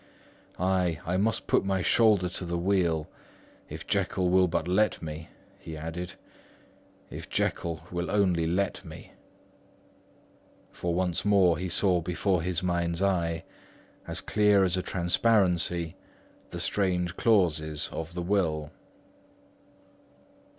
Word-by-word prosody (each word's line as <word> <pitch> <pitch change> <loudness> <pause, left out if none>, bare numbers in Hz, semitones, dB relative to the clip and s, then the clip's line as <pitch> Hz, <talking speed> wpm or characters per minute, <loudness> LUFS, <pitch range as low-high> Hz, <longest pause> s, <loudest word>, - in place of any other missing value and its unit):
Ay, 90 -3 +1
I 90 - -1
must 110 +3 0
put - - +2
my 95 -1 0
shoulders 105 -6 +3
to 90 - -5
the 85 0 -2
wheel—if 85 -4 -3
Jekyll 90 -1 0
will 95 0 +5
but 85 -1 -1
let 105 +4 +2
me," 80 0 -7 0.3
he 80 -1 -8
added, 85 +3 -5 1.0
"if - - -8
Jekyll 85 -2 -1
will 85 0 -3
only 90 -5 +2
let 95 +4 -1
me." - - -11 1.6
For 85 -1 -3
once 90 -2 0
more 95 -4 +4
he 90 0 -3
saw 90 0 +2
before 90 +1 0
his 90 0 -2
mind's 85 0 0
eye, 85 -4 0 0.6
as - - -4
clear 105 -1 +3
as 90 -2 +1
transparency, 90 -2 +1 0.5
the - - -6
strange 90 -3 0
clauses 80 -9 +2
of 80 +1 -6
the 90 - -3
will. 80 -6 0
90 Hz, 120 wpm, -28 LUFS, 85-95 Hz, 1.6 s, will